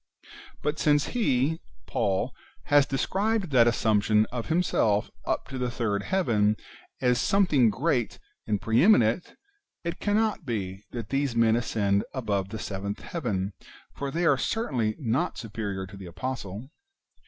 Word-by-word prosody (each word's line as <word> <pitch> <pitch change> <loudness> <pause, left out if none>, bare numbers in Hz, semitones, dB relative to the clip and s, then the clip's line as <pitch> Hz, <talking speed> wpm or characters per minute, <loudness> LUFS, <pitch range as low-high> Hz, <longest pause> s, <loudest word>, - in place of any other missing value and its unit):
But 150 +1 -1
since 145 -1 +3
he 160 - +1 0.2
(Paul) 95 -1 0 0.3
has 145 -1 +4
described 195 +7 0
that 120 -3 +6
assumption 110 -1 +3
of 120 -2 -4
himself 115 - +1 0.2
up - - -1
to 135 -1 -5
the 125 -1 0
third 110 -4 -1
heaven 110 - +1 0.4
as 125 -1 +3
something 155 - +4
great 125 - 0 0.3
and 105 -2 +1
pre 115 +3 +2
eminent, 170 - +4 0.5
it 170 0 -4
cannot 210 -2 +1
be 100 -7 -4
that 115 -3 -6
these 135 -3 0
men 115 -1 +4
ascend 105 -4 +1
above 100 -6 -1
the 110 - -5
seventh 100 -1 -4
heaven, 105 - -3 0.4
for 140 - -4
they 170 +5 -1
are - - +4
certainly 125 - -1
not 140 +6 -1
superior 105 -4 -4
to 95 +1 -12
the 95 -2 -9
apostle. 120 - -5
120 Hz, 140 wpm, -27 LUFS, 105-150 Hz, 0.5 s, that